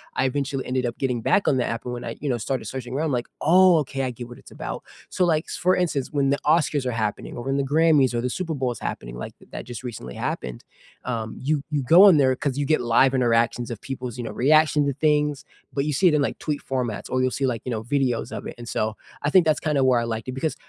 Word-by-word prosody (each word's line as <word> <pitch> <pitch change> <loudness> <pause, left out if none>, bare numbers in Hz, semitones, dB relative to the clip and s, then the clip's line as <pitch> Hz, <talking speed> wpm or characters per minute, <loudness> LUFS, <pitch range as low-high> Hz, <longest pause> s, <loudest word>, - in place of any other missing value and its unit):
I 130 - +1
eventually 135 0 -2
ended 125 0 -1
up 120 - -3
getting 125 -4 -1
back 195 - +2
on 135 - +4
the 125 - +1
app, 115 +2 -4
and 125 - -4
when 120 - -6
I, 115 - -5
you 145 - -2
know, 120 - +1
started 120 +2 -3
searching 125 +2 -6
around, 155 0 0
like, 120 -1 -1
"Oh, 180 +2 +6
okay, 135 -2 -3
I 130 - -1
get 120 0 -8
what 120 - -11
it's - - -16
about," - - -6 0.3
so, 185 - 0
like, 160 -2 +1
for 185 +1 +1
instance, 160 -7 -1
when 140 -2 +1
the 140 - +1
Oscars 150 -3 +2
are 125 - 0
happening 110 -3 -3
or 120 - -5
when 135 +1 0
the 140 - +1
Grammys 145 -2 +3
or 120 - 0
the 125 - -1
Super 165 +4 -3
Bowl 130 -2 -1
is 115 - -7
happening, - - -5
like, 65 - -8
th - - -20
that - - -7
just 120 -1 -8
recently 80 - -7
happened, 60 -1 -4 0.4
um, 115 -3 -3
you 145 +1 0
you 145 -2 0
go 175 +10 +8
in 165 - +6
there 130 -2 +3
'cause 140 0 -2
you 145 - 0
get 155 -3 +2
live 120 +3 +3
interactions 120 -1 +2
of 115 - -5
people's, 125 -3 -6
you 120 - -4
know, 110 - -5
reaction 150 +4 +3
to 140 - 0
things, 150 -1 +1 0.3
but 140 0 -1
you 150 - -1
see 180 +7 +3
it - - 0
in, 150 - +2
like, - - -1
tweet 150 -2 -3
formats 125 -5 -2
or 130 0 +1
you'll 130 - +2
see, 135 +2 -1
like, 115 -4 -2
you 125 - -3
know, 110 -1 -3
videos 125 -3 -1
of - - -8
it, - - -8
and, 120 - -9
so, 110 0 -1 0.3
I 145 - +1
think 180 -4 +5
that's 155 - +2
kinda 150 -4 +1
where 125 -2 +4
I 115 - -2
liked 115 0 -4
it 130 - -3
because 150 +4 -2
130 Hz, 280 wpm, -24 LUFS, 120-150 Hz, 0.4 s, go